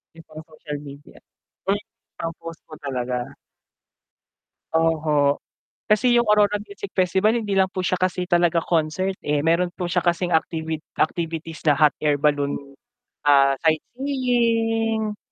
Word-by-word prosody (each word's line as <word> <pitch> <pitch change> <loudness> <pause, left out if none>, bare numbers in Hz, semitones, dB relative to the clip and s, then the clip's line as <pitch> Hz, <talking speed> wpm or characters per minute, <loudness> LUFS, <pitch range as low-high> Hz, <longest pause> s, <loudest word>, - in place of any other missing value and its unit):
Yung 165 - -15
pang 155 0 -10
social 155 -2 -8
media, 140 +1 -12 0.5
eh, 205 +1 0 0.4
pang 165 0 -3
post 165 0 -9
po 155 - -10
talaga. 125 -1 -3 1.4
Oho, 155 -3 +2 0.4
kasi 215 +4 +3
yung 235 - +2
Aurora 210 -1 +4
Music 200 -1 -9
Festival 190 +5 +2
hindi 205 -3 -2
lang 190 -1 +3
po 185 -2 -3
siya - - +1
kasi 180 0 -1
talaga 175 -1 +3
concert 165 +3 0
eh, 150 0 0
meron 170 +4 +2
po 180 0 -5
siya 175 0 0
kasing 175 0 0
activit 160 -1 -1 0.2
activities 165 -1 -2
na 145 -3 +3
hot 150 -1 +5
air 145 -1 +2
balloon, 145 -1 +1 0.7
ah, 140 -1 +5
sightseeing. 225 - 0
170 Hz, 135 wpm, -23 LUFS, 155-200 Hz, 1.4 s, hot